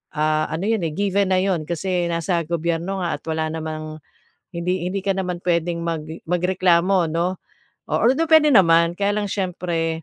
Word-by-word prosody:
ah 155 0 +1
ano 165 +4 -3
'yon 220 -5 0
given 200 0 +1
na 185 - +3
'yon 185 -5 0
kasi 175 +1 -1
nasa 170 +1 0
gobyerno 170 +3 -2
nga 170 - -1
at - - -46
wala 160 0 -1
namang 155 -1 -6 0.5
hindi 175 +1 -2
hindi 195 +1 -3
ka 195 - +1
naman 180 -2 -2
puwedeng 170 -1 0
mag 165 -2 -2 0.3
magreklamo 180 0 +2
'no, 175 +3 -1 0.5
although 270 +7 +2
puwede 315 -1 +6
naman 170 -5 +5
kaya 205 0 +1
lang 210 -1 -1
siyempre, 170 -4 -2
175 Hz, 160 wpm, -22 LUFS, 165-190 Hz, 0.5 s, puwede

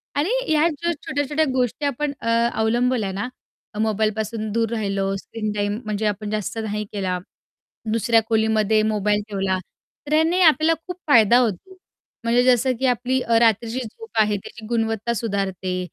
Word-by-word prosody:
आणि 290 +6 +1 0.2
ह्या 310 +1 +4
ज्या 340 +2 -2 0.2
छोट्या-छोट्या 290 +3 0
गोष्टी 250 +2 -1
आपण 285 +1 -1
अ, - - -5 0.3
अवलंबल्या 225 -1 +1
ना, 200 +5 -3 0.5
मोबाईलपासून 220 0 -1
दूर 225 0 0
राहिलो, 195 -3 -1
स्क्रीन 215 +1 -5
टाईम 205 +1 -1
म्हणजे 215 0 -2
आपण 210 0 -3
जास्त 215 +1 -3
नाही 210 0 -3
केला, 185 -3 -1 0.7
दुसऱ्या 230 0 +3
खोलीमध्ये 220 -1 +2
मोबाईल 210 0 +1
ठेवला, 195 -2 0 0.5
तर 300 - -2
याने 330 +4 +3
आपल्याला 315 -1 +5
खूप 360 -1 -5
फायदा 235 -4 +6
होतो. 250 - -2 0.5
म्हणजे 235 +1 +3
जसं 255 0 +3
की 265 - 0
आपली 255 +1 +1
अ, 230 -2 +2
रात्रीची 230 +1 +2
झोप 450 - -11
आहे 210 -1 +1
त्याची 220 +3 -11
गुणवत्ता 225 0 -1
सुधारते 195 -4 -2
225 Hz, 150 wpm, -22 LUFS, 210-255 Hz, 0.7 s, फायदा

